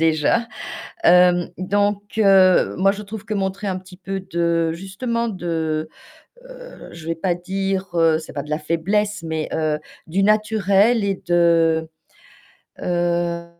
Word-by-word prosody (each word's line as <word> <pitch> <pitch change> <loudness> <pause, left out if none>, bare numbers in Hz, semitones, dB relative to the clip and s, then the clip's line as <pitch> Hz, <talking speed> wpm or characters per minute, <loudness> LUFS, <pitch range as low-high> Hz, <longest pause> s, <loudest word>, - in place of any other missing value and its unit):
déjà. 165 +8 +2 0.6
Hem, 180 0 +5
donc 205 +2 0 0.2
heu, 190 -3 +5
moi 195 +2 +3
je 210 +1 -7
trouve 210 +1 -8
que 215 -1 -4
montrer 195 +1 -2
un 185 -1 -2
petit 185 0 -14
peu 195 0 -5
de 170 -2 0
justement 230 +7 -3
de, 160 -5 -2 0.6
heu, - - -12
je 165 -1 -11
vais 165 - -1
pas 175 +2 -1
dire 190 +2 -3 0.3
c'est 160 - -11
pas 140 - -4
de 150 - -11
la 150 - 0
faiblesse, 200 +6 -1
mais, 160 -1 -3
heu, 155 -1 0 0.3
du 185 +5 0
naturel 215 +1 +3
et 195 -1 +1
de, 165 -2 +3 0.9
heu 175 -1 -1
185 Hz, 140 wpm, -21 LUFS, 165-200 Hz, 0.9 s, Hem